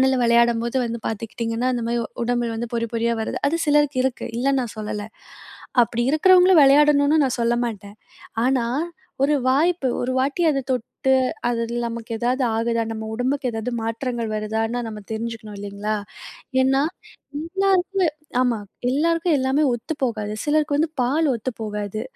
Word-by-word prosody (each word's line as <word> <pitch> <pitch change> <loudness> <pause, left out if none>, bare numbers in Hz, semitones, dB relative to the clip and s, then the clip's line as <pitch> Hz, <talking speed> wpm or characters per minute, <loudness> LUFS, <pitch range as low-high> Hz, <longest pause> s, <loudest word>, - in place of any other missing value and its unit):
மண்ணுல 265 0 +4
விளையாடும்போது 235 +1 +3
வந்து 235 0 -4
பார்த்துக்கிட்டீங்கன்னா, 230 +3 -2
இந்த 235 - -3
மாரி 235 0 0
உ - - -4 0.2
உடம்புல 240 -1 0
வந்து 235 +1 -5
பொறி 230 0 -1
பொறியா 230 0 +1
வருது. - - -3
அது 335 +3 -1
சிலருக்கு 295 -2 +3
இருக்கு. 260 -2 -1
இல்லன்னு 270 +1 +2
நான் 230 -2 -6
சொல்லல. 210 -1 -4 0.8
அப்பிடி 235 +1 -1
இருக்கிறவங்களும் 360 0 +6
வெளையாடணுன்னு 290 +2 +5
நான் 255 -1 -1
சொல்ல 235 +1 +2
மாட்டேன். 205 -2 -7 0.5
ஆனா, 260 -2 +2 0.6
ஒரு 295 +1 +3 0.2
வாய்ப்பு. 315 +2 +2 0.2
ஒரு 250 - -1
வாட்டி 280 +6 0
அத 280 - 0
தொட்டு, 255 +1 -1 0.4
அது 240 - 0
இதுல 240 +1 -3
நமக்கு 230 0 -6
ஏதாவது 250 +3 0
ஆகுதா? 230 0 0
நம்ம 220 0 -5
உடம்புக்கு 255 +2 -1
ஏதாவது 225 +1 -3
மாற்றங்கள் 230 0 -3
வருதான்னு 220 +2 -1
நம்ம 215 -1 -6
தெரிஞ்சுக்கணும் 220 -1 -5
இல்லைங்களா. 205 +1 -4 0.7
ஏன்னா, 270 +1 +3 0.6
எல்லாருக்கு 380 +1 +1 0.4
ஆமா, 245 -3 +1 0.3
எல்லாருக்கும் 330 +3 +2
எல்லாமே 265 +3 +2
ஒத்து 240 +7 -4
போகாது. 215 -4 -2
சிலருக்கு 300 0 +1
வந்து 315 +2 +1
பால் 295 +5 +2
ஒத்து 235 +2 -3
போகாது. 210 0 -4
245 Hz, 150 wpm, -22 LUFS, 225-285 Hz, 0.8 s, இருக்கிறவங்களும்